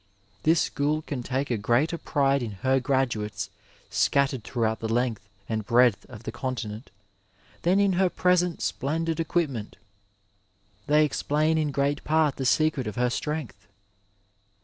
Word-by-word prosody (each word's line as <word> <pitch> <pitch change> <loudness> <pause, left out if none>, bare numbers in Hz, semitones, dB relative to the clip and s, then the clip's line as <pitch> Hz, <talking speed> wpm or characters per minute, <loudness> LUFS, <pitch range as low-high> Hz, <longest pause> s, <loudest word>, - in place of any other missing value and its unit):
This 160 +5 +4
school 150 +2 0
can 140 -5 -4
take 130 +2 -2
a 120 - +1
greater 120 +10 +2
pride 140 -2 +1
in 115 -4 -4
her 135 +1 +4
graduates 115 -7 -1 0.4
scattered 140 -4 +2
throughout 110 -3 -1
the 110 0 -3
length 120 -2 0 0.3
and 110 -1 -2
breadth 120 -1 +3
of 115 -3 -11
the - - -4
continent 120 -3 -5 0.7
than 185 +3 +3
in 200 -1 +3
her 185 +1 +3
present 180 -1 +1
splendid 165 +4 -1
equipment; 155 -10 -1 1.1
they 150 +1 +5
explain 155 +2 +1
in 155 -1 0
great 140 +1 0
part 155 -2 +2
the 135 - -1
secret 140 0 +2
of 105 - -4
her 125 0 +1
strength. 125 -10 -4
135 Hz, 145 wpm, -26 LUFS, 120-155 Hz, 1.1 s, they